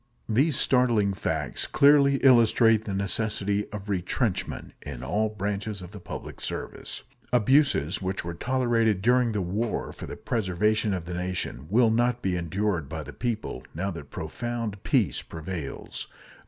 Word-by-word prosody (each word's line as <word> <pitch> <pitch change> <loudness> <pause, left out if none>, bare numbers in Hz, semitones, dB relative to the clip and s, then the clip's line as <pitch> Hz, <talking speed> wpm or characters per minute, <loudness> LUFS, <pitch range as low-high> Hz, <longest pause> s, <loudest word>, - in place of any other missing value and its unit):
These 135 +6 +2
startling 120 -6 +3
facts - - -2
clearly 140 -1 +5
illustrate 115 -3 +5
the 100 - -3
necessity 100 +1 -1
of 105 -1 -7
retrenchment 95 +2 -1
in 65 -4 -7
all 105 +11 +1
branches 105 0 -3
of 90 -1 -9
the 105 - -9
public - - -8
service. - - -5 0.3
Abuses 125 - +3
which 95 -2 -2
were 85 - -3
tolerated 115 -1 +1
during 125 0 +3
the 105 -3 0
war 105 +6 -2
for - - -8
the - - -7
preservation 105 -1 +1
of 85 -3 -5
the 90 - -5
nation 90 -6 -3
will 115 +2 +4
not 120 +1 +1
be 95 -2 +1
endured 90 -2 -1
by 80 0 -4
the - - -9
people, 110 - -3
now 95 +4 -1
that 85 -5 -8
profound 110 +4 -4
peace - - +2
prevails. 80 -2 -6
105 Hz, 150 wpm, -27 LUFS, 90-120 Hz, 0.3 s, clearly